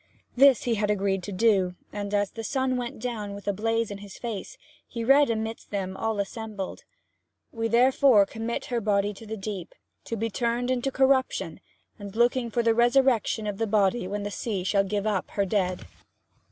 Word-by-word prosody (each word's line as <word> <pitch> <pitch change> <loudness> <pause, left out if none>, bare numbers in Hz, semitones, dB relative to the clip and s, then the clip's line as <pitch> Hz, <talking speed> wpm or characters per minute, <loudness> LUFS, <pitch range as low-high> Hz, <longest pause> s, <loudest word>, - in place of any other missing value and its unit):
This 270 -1 +6
he 240 - +1
had 210 -1 0
agreed 195 -2 +1
to 205 - -7
do; 190 -3 +2 0.2
and 205 -1 -4
as 205 -1 +1
the 225 - -7
sun 260 +2 0
went 245 -1 -4
down 215 -4 -4
with 200 - -11
a 205 - +2
blaze 225 +2 -1
in 200 - -6
his 200 -1 -11
face 225 -5 -6 0.3
he 230 -2 -5
read 275 +3 +5
amidst 225 0 -3
them 190 -2 -3
all 220 +1 -2
assembled: 205 -1 -5 0.7
'We 225 0 -2
therefore 245 -1 +5
commit 225 +3 -4
her 235 - +1
body 205 -1 +1
to 220 +2 -12
the 220 +1 -5
deep, 195 -3 -6 0.3
to 230 - -3
be 225 +1 -2
turned 240 +3 -1
into 255 +1 0
corruption, 265 0 +1 0.4
looking 235 +4 +1
for 235 +1 0
the 230 0 +4
resurrection 240 -2 +3
of 205 -2 -4
the 225 - 0
body 200 -1 +2
when 205 +1 -3
the 205 - -4
sea 200 -4 -3
shall 195 +1 +2
give 200 +1 -2
up 205 -4 -1
her 200 - 0
dead.' 185 -2 -1
220 Hz, 190 wpm, -26 LUFS, 200-235 Hz, 0.7 s, This